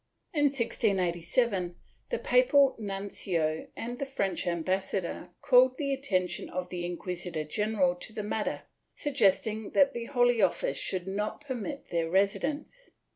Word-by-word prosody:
In 295 -2 +3
1687, 195 -6 +1 0.3
the 485 - 0
papal 285 - +4
nuncio 195 -6 -2
and 240 +2 -5
the 275 - -1
French 200 -10 -1
ambassador 185 +2 -1
called 255 +1 +5
the 280 -2 -1
attention 190 -10 -1
of 180 0 -4
the 180 -1 -4
inquisitor 175 -2 -3
general 200 +2 +1
to 180 - -7
the 215 - -5
matter, 210 +1 -2 0.3
sug 290 -2 -3
gesting 215 -2 +2
that 280 -2 +4
the 235 -1 -4
Holy 245 -3 +3
Office - - +1
should 185 -1 -2
not 210 +6 -3
permit 275 +2 -5
their 165 -1 0
residence. 270 - 0
205 Hz, 135 wpm, -29 LUFS, 180-255 Hz, 0.3 s, called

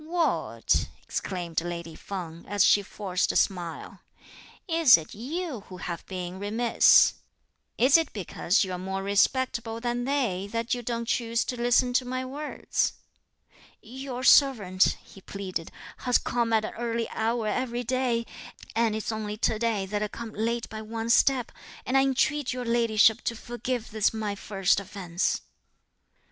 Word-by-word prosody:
"What!" 335 +1 0 0.2
exclaimed 175 -4 -3
lady 170 -1 -5
Feng, 170 -3 -7
as 205 -2 +3
she 205 - +5
forced 195 -2 -2
a - - -8
smile, 175 -4 -1 0.7
"is 325 - +7
it 160 -1 -9
you 290 - -4
who 185 - -9
have 170 -1 -5
been 185 -1 -5
remiss? 225 +4 +5 0.6
Is 265 +6 +6
it 325 - -1
because 195 0 0
you're 185 -2 -4
more 190 +1 -4
respectable 225 +2 +1
than 240 0 -2
they 230 -9 -1
that 230 +1 -1
you 245 - -2
don't 235 0 -3
choose 230 0 0
to 250 - -3
listen 245 +1 +2
to 255 - +3
my 255 +1 -3
words?" 290 +3 -2 0.9
"Your 255 +2 -7
servant," 210 -11 +4
he 195 - -15
pleaded, 185 -4 -5 0.3
"has 250 -1 +2
come 235 -2 -1
at 220 -1 +2
an - - -6
early 230 -1 -1
hour 225 +1 -1
every 245 +2 -1
day; 245 -1 0 0.5
and 225 -1 +2
it's 220 +1 -3
only 215 -1 -4
to 215 0 0
day 220 -4 0
that 205 +2 -3
I 210 - 0
come 225 +1 -8
late 230 +2 -2
by 220 -1 -7
one 225 +1 -3
step; 255 0 +3 0.3
and 255 - -1
I 270 - +6
entreat 270 +1 +1
your 250 -1 -4
ladyship 230 -1 +3
to 230 - -1
forgive 240 0 -4
this 215 -1 +2
my 215 -2 -2
first 195 -1 +1
offence." 185 -3 -2
225 Hz, 155 wpm, -27 LUFS, 200-245 Hz, 0.9 s, is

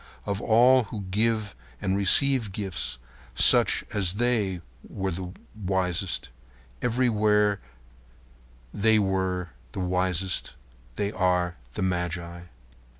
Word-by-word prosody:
Of 100 -1 -3
all 125 +2 +4
who 105 0 -7
give 110 - 0 0.2
and 95 0 -1
receive 115 +3 +4
gifts, 95 - -4 0.4
such - - +6
as 95 -3 -1
they 105 -6 0 0.3
are 95 -2 -4 0.2
wisest. 95 - -2 0.5
Everywhere 105 -4 +1 1.1
they 110 +2 +3
are 95 - -1 0.2
wisest. 90 0 -1 0.4
They 100 +6 -2
are 90 -3 0 0.2
the - - -2
magi. 85 -1 -3
95 Hz, 90 wpm, -26 LUFS, 90-110 Hz, 1.1 s, such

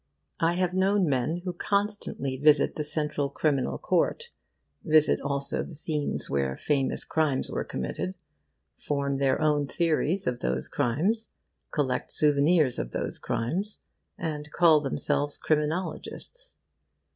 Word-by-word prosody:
I 165 +1 +2
have 180 -1 0
known 190 0 +2
men 145 +6 0
who 180 - -2
constantly 200 -8 -1
visit 145 +1 +4
the 150 - -2
Central 150 -1 0
Criminal 140 -2 0
Court, 475 0 0 0.5
visit 155 -1 +4
also 140 -1 -2
the 170 - -6
scenes 150 -1 -1
where 70 -1 -1
famous 140 - 0
crimes 150 -4 0
were - - -1
committed, 185 - -4 0.6
form 140 -1 -1
their 135 -1 +2
own 150 -2 +2
theories 165 +4 0
of 125 -1 -1
those 65 +1 -2
crimes, 190 - 0 0.4
collect 130 -4 -1
souvenirs 150 -1 +3
of - - -4
those - - -3
crimes, 185 - -2 0.4
and 150 -2 -4
call 165 -3 +5
themselves 145 +1 0
Criminologists. 175 - -3
150 Hz, 125 wpm, -27 LUFS, 140-175 Hz, 0.6 s, call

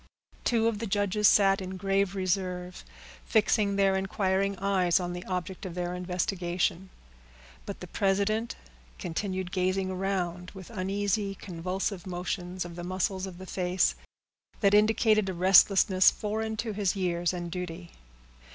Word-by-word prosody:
Two 230 -2 +2
of 225 -3 -1
the 230 - -3
judges 205 +1 +2
sat 195 -1 +4
in 185 0 -6
grave 195 0 0
reserve, 185 -1 -2 0.4
fixing 210 -2 +2
their 195 -1 +3
inquiring 195 0 0
eyes 190 -2 +2
on 175 -1 -3
the 175 0 -6
object 185 0 -4
of 180 -3 -6
their 175 0 -2
investigation; 180 0 -2 0.8
but 200 - -6
the - - -5
president 205 +4 0 0.4
continued 185 +1 -3
gazing 185 0 0
around 180 -2 -2
with 190 +2 -10
uneasy, 200 0 -1
convulsive 185 +1 -4
motions 180 0 -4
of 170 -1 -9
the 175 - -6
muscles 185 +1 -2
of 180 -2 -9
the 185 - -9
face, 180 -1 +1 0.7
that 200 -2 +4
indicated 215 -1 +4
a 185 - -4
restlessness 190 +1 +6
foreign 220 +1 -3
to 220 -1 -3
his 200 -2 0
years 175 -2 0
and 175 -2 -5
duty. 180 -1 -6
190 Hz, 140 wpm, -28 LUFS, 180-200 Hz, 0.8 s, restlessness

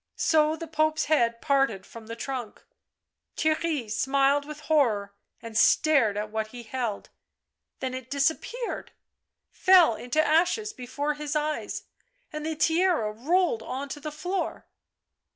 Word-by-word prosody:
so 310 -1 +3
the 330 - -7
Pope's 310 0 +1
head 235 -6 +2
parted 270 -10 +1
from 225 -1 -12
the 230 - -6
trunk. 245 -2 -6 0.7
Theirry 315 -5 0
smiled 275 +5 +2
with 300 0 -9
horror 230 -11 +1 0.3
and 230 -1 -8
stared 235 -3 +4
at 210 0 -3
what 220 0 -2
he 240 +2 -10
held. 230 -3 -4 0.7
Then 260 -1 -2
it 255 -1 -7
disappeared, 320 - -2 0.6
fell 365 -8 +6
into 250 +7 -2
ashes 360 +7 +2
before 285 +4 -3
his 295 0 -5
eyes, 300 0 -2 0.5
and 305 0 -4
the 315 0 -2
tiara 325 - +2
rolled 295 - +1
on 270 +4 -5
to 295 - -6
the 305 +1 -6
floor. 360 +6 -3
285 Hz, 135 wpm, -27 LUFS, 235-315 Hz, 0.7 s, fell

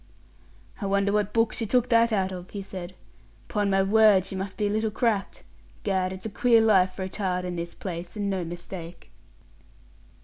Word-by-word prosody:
"I 200 - -1
wonder 200 0 +2
what 210 0 +1
book 225 0 +2
she 225 - -3
took 250 +3 +2
that 230 -1 +4
out 190 -3 +1
of?" 180 0 -8
he 200 -1 -6
said. 185 -1 -8 0.5
"'Pon 205 -1 0
my 195 0 +3
word 205 -2 +5
she - - -6
must 190 0 -5
be 210 - 0
a - - +1
little 220 +1 0
cracked. 215 -2 -1 0.4
'Gad, 185 -2 0
it's 190 +2 -8
a - - -2
queer 235 +2 +4
life 190 -4 +4
for 190 - -5
a - - -3
child 185 -2 -2
in 180 -1 -4
this 170 0 -5
place, 175 -1 -6
and 205 -1 -1
no 190 -2 -1
mistake." 170 0 -8
195 Hz, 200 wpm, -26 LUFS, 185-215 Hz, 0.5 s, word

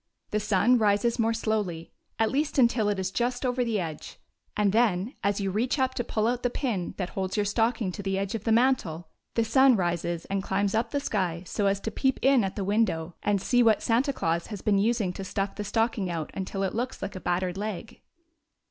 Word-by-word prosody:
The 210 - +1
sun 210 +4 +3
rises 215 +3 +2
more 225 0 +3
slowly, 210 -7 -2 0.3
at 225 -1 +2
least 295 +3 -1
until 235 -4 +3
it 205 - 0
is 190 0 -2
just 245 +4 -1
over 250 0 +1
the 225 -3 0
edge; 160 -4 -6 0.4
and 205 -2 +3
then, 215 0 +2
as 200 0 +1
you 195 -1 -1
reach 235 +9 0
up 260 -1 +1
to 240 - -2
pull 215 -1 -1
out 245 +1 0
the 245 - +1
pin 230 -8 -3
that 185 -2 -3
holds 190 +1 -3
your 205 - +2
stocking 225 -1 0
to 190 - -6
the 195 -1 -1
edge 195 0 -2
of 225 -3 -4
the 225 - 0
mantel, 220 -10 +1 0.3
the 230 - +3
sun 265 +2 +5
rises 175 -2 -1
and 195 0 -2
climbs 195 +1 0
up 225 +2 0
the 285 - -1
sky 185 - -2
so 200 +2 -1
as 195 0 +1
to 220 - -3
peep 265 +4 +1
in 270 -3 +5
at 195 - -3
the 200 - -2
window 185 -5 0
and 205 -1 +1
see 245 0 +3
what 225 -3 +4
Santa 245 +5 +2
Claus 170 -9 -1
has 205 -4 -7
been 205 -2 +3
using 215 -3 +1
to 195 - -6
stuff 195 +1 -2
the 210 - -5
stocking 225 -2 0
out 165 -3 -4
until 195 +1 -3
it 190 - -1
looks 245 +1 -3
like 195 0 -5
a 185 - -6
battered 180 0 -1
leg. 215 +2 -5
210 Hz, 230 wpm, -27 LUFS, 190-235 Hz, 0.4 s, sun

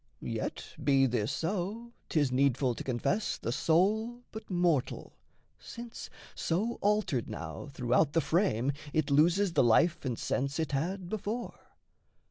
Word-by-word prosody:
Yet - - -3 0.2
be 135 -2 +4
this 120 -4 0
so, 205 +7 -3 0.2
'tis 145 -5 +2
needful 130 -1 +2
to - - -6
confess 135 - -1
The 115 - -3
soul 215 - +1
but 220 0 -9
mortal, 175 -7 0 0.5
since, 235 0 -8 0.2
so 210 +8 -1
altered 205 - +1
now 80 - -6
Throughout 135 +3 +1
the 165 - +4
frame, 150 - +1 0.2
it 155 -1 +1
loses 170 +6 +4
the - - +4
life 160 +8 +3
and 125 -4 -2
sense 140 +2 -1
It 160 -2 -1
had 175 +7 -2
before. 215 +4 -3
165 Hz, 135 wpm, -31 LUFS, 135-205 Hz, 0.5 s, be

